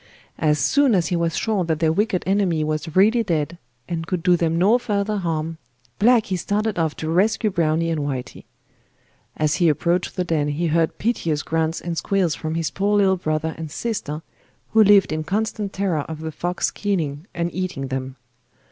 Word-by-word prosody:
As 150 -2 +2
soon 255 - +3
as 175 -4 +1
he 180 - 0
was 170 -1 0
sure 215 -4 0
that 160 -2 0
their 160 -1 +3
wicked 200 0 0
enemy 190 -5 +1
was 155 +1 -3
really 215 +5 +5
dead, 170 -4 -2 0.3
and 165 -2 -4
could 180 -2 -2
do 180 - +5
them 165 -1 0
no 205 +8 +4
further 210 -2 -1
harm, 165 -3 -2 0.4
Blacky 215 -4 +3
started 210 +1 -1
off 160 -2 0
to 155 - -5
rescue 210 +4 +2
Browny 165 -2 +1
and 160 -2 -1
Whitey. 135 -3 -5 0.9
As 155 -1 +1
he 175 -3 +4
approached 170 +4 0
the 180 - 0
den 160 -4 0
he 150 +4 -1
heard 165 0 +1
piteous 165 -9 -1
grunts 160 0 -1
and 170 -1 -4
squeals 190 -5 +1
from 160 0 -4
his 165 -3 -1
poor 205 +1 +1
little 190 -2 +3
brother 155 -1 -1
and 160 -1 -5
sister 160 -5 -4 0.5
who 220 0 +6
lived 205 -2 +5
in 155 0 -2
constant 210 +2 -2
terror 190 -7 -1
of 160 -1 -6
the 160 0 -4
fox 175 +4 -2
killing 165 -6 -2
and 170 0 -2
eating 180 -8 -3
them. 130 0 -4
170 Hz, 185 wpm, -22 LUFS, 155-200 Hz, 0.9 s, who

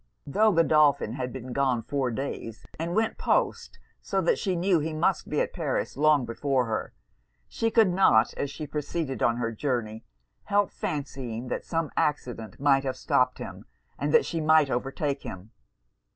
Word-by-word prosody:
Tho' 215 +10 +3
Godolphin 150 - +3
had 125 -1 -4
been 130 -1 -7
gone 130 -4 +1
four 135 +1 -1
days, 115 -2 -5
and 170 +2 -2
went 220 0 0
post, - - 0 0.2
so - - -1
that 485 - +2
she 190 -4 -1
knew 175 0 +2
he 155 +1 -3
must 170 +4 0
be 150 - 0
at - - -2
Paris 155 -7 -2
long 150 -2 +3
before 130 +2 0
her, 110 -1 -3 0.5
she 225 - -1
could 225 -3 +4
not, 125 -11 +4
as 140 - -3
she 150 +2 -6
proceeded 150 -3 -3
on 115 +2 +2
her 115 -1 -1
journey, 115 -2 -3 0.4
help 205 -2 +2
fancying 130 -5 -4
that - - -3
some 165 -3 -2
accident 120 -7 -2
might 135 -1 +3
have 130 -1 -3
stopped 125 0 +1
him, - - -8 0.3
and - - -1
that 470 -2 +5
she 165 - -2
might 155 -3 +4
overtake 135 +3 -2
him. 95 +4 -9
140 Hz, 170 wpm, -27 LUFS, 125-160 Hz, 0.5 s, that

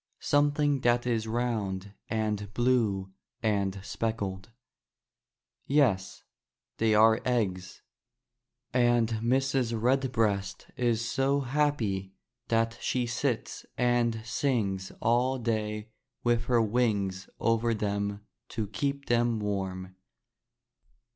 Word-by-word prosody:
Something 145 0 +2
that 120 0 +2
is 115 -2 0
round 105 -5 -2 0.2
and 105 -2 -1
blue 110 -6 +1 0.3
and 100 -3 0
speckled. 100 -3 -3 1.2
Yes, 120 -10 +2 0.5
they 110 -1 +3
are 110 +1 +5
eggs; 95 -7 -1 0.9
and 120 -2 +3
Mrs. 120 +1 +1
Redbreast 115 -6 0
is 115 -2 0
so 140 +2 +1
happy 120 -9 0 0.3
that 115 0 +1
she 125 -1 0
sits 120 0 -2
and 120 -2 +1
sings 105 -7 -1
all 125 +3 +2
day 110 -2 -2 0.3
with 120 -1 +2
her 120 -2 +3
wings 105 -5 0
over 115 0 +2
them 100 0 -2 0.2
to 110 - -2
keep 140 +7 -2
them 120 -1 +2
warm. 95 -2 -3
115 Hz, 95 wpm, -29 LUFS, 100-125 Hz, 1.2 s, are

